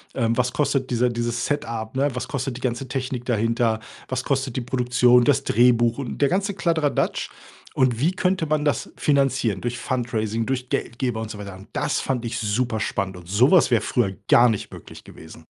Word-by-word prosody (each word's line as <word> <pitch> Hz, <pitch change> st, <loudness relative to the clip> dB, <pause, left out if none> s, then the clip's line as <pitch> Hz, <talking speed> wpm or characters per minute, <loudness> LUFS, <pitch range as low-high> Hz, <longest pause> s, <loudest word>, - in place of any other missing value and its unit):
Ähm, 115 Hz, -2 st, 0 dB
was 125 Hz, 0 st, +1 dB
kostet 135 Hz, -3 st, 0 dB
diese 120 Hz, +1 st, +2 dB
dieses 120 Hz, 0 st, -2 dB
Setup, 115 Hz, -5 st, -3 dB
ne, 140 Hz, +2 st, +2 dB
was 125 Hz, -, -4 dB
kostet 135 Hz, -2 st, -3 dB
die -, -, -11 dB
ganze 125 Hz, +1 st, -2 dB
Technik 130 Hz, -2 st, -3 dB
dahinter? 115 Hz, -1 st, +1 dB, 0.3 s
Was 130 Hz, 0 st, -2 dB
kostet 135 Hz, -2 st, -1 dB
die -, -, 0 dB
Produktion, 125 Hz, 0 st, +3 dB
das 145 Hz, -, +3 dB
Drehbuch 120 Hz, 0 st, +3 dB
und 135 Hz, -4 st, -5 dB
der 140 Hz, -, +4 dB
ganze 195 Hz, +2 st, 0 dB
Kladderadatsch. 165 Hz, -6 st, 0 dB, 0.4 s
Und, 125 Hz, -3 st, +1 dB
wie 165 Hz, +7 st, +2 dB
könnte 185 Hz, -3 st, 0 dB
man 150 Hz, 0 st, 0 dB
das 145 Hz, -, -1 dB
finanzieren 135 Hz, -8 st, +1 dB
durch 120 Hz, 0 st, -3 dB
Fundraising, 115 Hz, -3 st, -2 dB
durch 125 Hz, -1 st, -2 dB
Geldgeber“, 120 Hz, -2 st, -2 dB
und 110 Hz, -, -5 dB
so 105 Hz, -, -7 dB
weiter. 100 Hz, -2 st, -8 dB
Und, 95 Hz, -, -13 dB
das -, -, 0 dB
fand 125 Hz, -3 st, -2 dB
ich 115 Hz, 0 st, -3 dB
super 110 Hz, +1 st, -1 dB
spannend 95 Hz, -3 st, -2 dB
und 85 Hz, -1 st, -13 dB
sowas 130 Hz, -, +5 dB
wäre 115 Hz, -, +4 dB
früher 100 Hz, -6 st, 0 dB
gar 120 Hz, 0 st, +6 dB
nicht 110 Hz, -, -3 dB
möglich -, -, -12 dB
gewesen. 80 Hz, 0 st, -13 dB
125 Hz, 190 wpm, -23 LUFS, 115-135 Hz, 0.4 s, gar